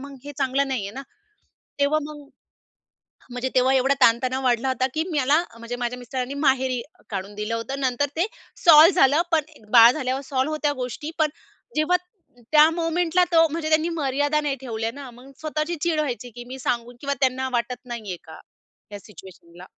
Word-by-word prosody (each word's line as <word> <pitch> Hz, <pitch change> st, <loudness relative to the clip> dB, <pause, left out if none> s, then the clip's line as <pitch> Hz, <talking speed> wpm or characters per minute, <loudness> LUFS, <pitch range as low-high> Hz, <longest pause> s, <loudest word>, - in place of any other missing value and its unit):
मग 280 Hz, 0 st, -10 dB
हे 290 Hz, -, -7 dB
चांगलं 275 Hz, 0 st, +1 dB
नाही 240 Hz, -7 st, -2 dB
आहे 200 Hz, -, -8 dB
ना. 270 Hz, -, -6 dB, 0.8 s
तेव्हा 290 Hz, +2 st, +3 dB
मग, 295 Hz, -1 st, -9 dB, 1.0 s
म्हणजे 250 Hz, +1 st, -3 dB
तेव्हा 260 Hz, +1 st, +3 dB
एवढा 270 Hz, +2 st, +3 dB
ताण 235 Hz, -2 st, +6 dB
तणाव 260 Hz, +1 st, -1 dB
वाढला 245 Hz, +1 st, +1 dB
होता. 260 Hz, 0 st, +1 dB
की 315 Hz, +1 st, 0 dB
मला 290 Hz, +3 st, +3 dB, 0.2 s
म्हणजे 235 Hz, +1 st, -6 dB
माझ्या 245 Hz, 0 st, -3 dB
मिस्टरांनी 250 Hz, +2 st, -4 dB
माहेरी 260 Hz, -2 st, +1 dB, 0.3 s
काढून 200 Hz, +1 st, -5 dB
दिलं 210 Hz, +2 st, -3 dB
होतं. 270 Hz, +4 st, -5 dB
नंतर 260 Hz, +2 st, 0 dB
ते 345 Hz, -, +2 dB, 0.4 s
सॉल्व्ह 330 Hz, +1 st, +8 dB
झालं. 285 Hz, +5 st, +5 dB
पण 315 Hz, -2 st, +4 dB, 0.3 s
बाळ 235 Hz, -1 st, +9 dB
झाल्यावर 265 Hz, -2 st, -2 dB
सॉल्व्ह 270 Hz, +3 st, -1 dB
होत्या 300 Hz, -1 st, 0 dB
गोष्टी. 250 Hz, +6 st, -5 dB
पण 310 Hz, -1 st, +3 dB, 0.5 s
जेव्हा 310 Hz, +4 st, +3 dB, 0.6 s
त्या 305 Hz, +1 st, +7 dB
मूव्हमेंटला 335 Hz, +1 st, +1 dB
तो 330 Hz, 0 st, +6 dB
म्हणजे 310 Hz, 0 st, -3 dB
त्यांनी 315 Hz, +1 st, +2 dB
मर्यादा 290 Hz, -2 st, 0 dB
नाही 290 Hz, -2 st, -2 dB
ठेवल्या 225 Hz, -3 st, -3 dB
ना, 275 Hz, -3 st, -9 dB
मग 250 Hz, +3 st, -15 dB
स्वतःची 310 Hz, +2 st, -2 dB
चीड 335 Hz, -3 st, +1 dB
व्हायची 245 Hz, -5 st, -4 dB
की 240 Hz, -, -8 dB
मी 260 Hz, +1 st, -7 dB
सांगून 240 Hz, -1 st, -3 dB
किंवा 280 Hz, 0 st, -2 dB
त्यांना 260 Hz, 0 st, +1 dB
वाटत 245 Hz, +1 st, -2 dB
नाही 235 Hz, -2 st, -6 dB
आहे 180 Hz, -, -3 dB
का? 160 Hz, 0 st, -11 dB, 0.5 s
ह्या 205 Hz, -, -7 dB
सिच्युएशनला. 180 Hz, -3 st, -14 dB
265 Hz, 180 wpm, -23 LUFS, 245-300 Hz, 1.0 s, बाळ